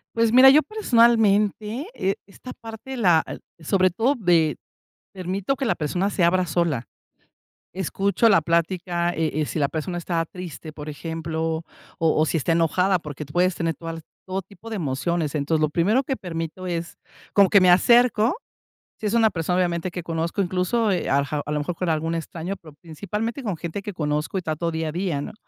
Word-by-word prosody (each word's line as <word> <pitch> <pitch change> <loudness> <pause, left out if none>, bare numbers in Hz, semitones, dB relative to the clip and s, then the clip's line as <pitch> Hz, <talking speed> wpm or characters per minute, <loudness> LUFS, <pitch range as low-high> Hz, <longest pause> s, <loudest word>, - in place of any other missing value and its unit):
Pues 230 0 +2
mira, 260 +2 +9
yo 300 +3 +6
personalmente, 230 - +2
eh, 195 +1 -1
esta 230 +5 -11
parte 225 +4 -9
la 175 -8 +4 0.4
sobre 185 +3 +2
todo 235 +10 +1
de 170 - +2 0.6
permito 190 +7 -2
que 270 - -2
la 225 - +1
persona 180 +6 -1
se 190 - -1
abra 180 +1 +3
sola. 155 -7 0 0.9
Escucho 195 +4 +1
la 195 -6 +5
plática, 170 +1 0
eh 160 -2 -1
eh, - - +1
si - - -4
la 140 -2 +2
persona 165 +4 -4
está 170 -1 -1
triste, 170 -2 -8
por 150 0 -9
ejemplo, 160 +1 -3 0.3
o 160 -1 +2
o - - +4
si 165 - 0
está 165 +2 0
enojada, 180 +3 +2
porque 150 -1 -7
tú 145 - -14
puedes 180 0 +2
tener 165 -1 -1
todas 165 +1 -6
las 165 - -9 0.2
todo 190 +1 -3
tipo 200 +4 -13
de 220 - -4
emociones. 160 -1 -1
Entonces, 155 +2 0
lo 155 -1 +2
primero 200 - +2
que 270 0 -2
permito 165 -1 -5
es 170 -1 -4 0.4
como 200 -2 +5
que 200 - +6
me 180 -1 +6
acerco, 235 - +4 0.6
si - - -6
es 210 - 0
una 225 -2 +4
persona, 180 -1 -1
obviamente, 175 -1 0
que 180 - -5
conozco, 165 +3 -2
incluso, 190 +5 0
eh 180 - -1
ajá, 140 +1 0
a 150 - -4
lo 150 - 0
mejor 165 +4 -3
con 180 0 -2
algún 160 +1 0
extraño, 165 +3 -4
pero 155 -3 -14
principalmente 210 - -4
con 200 -7 -2
gente 170 +5 -5
que 205 - -5
conozco 150 +3 -2
y - - -5
trato 165 +1 -2
día 160 0 -2
a - - -3
día, 175 -4 -2
¿no? - - -6
175 Hz, 195 wpm, -23 LUFS, 160-200 Hz, 0.9 s, mira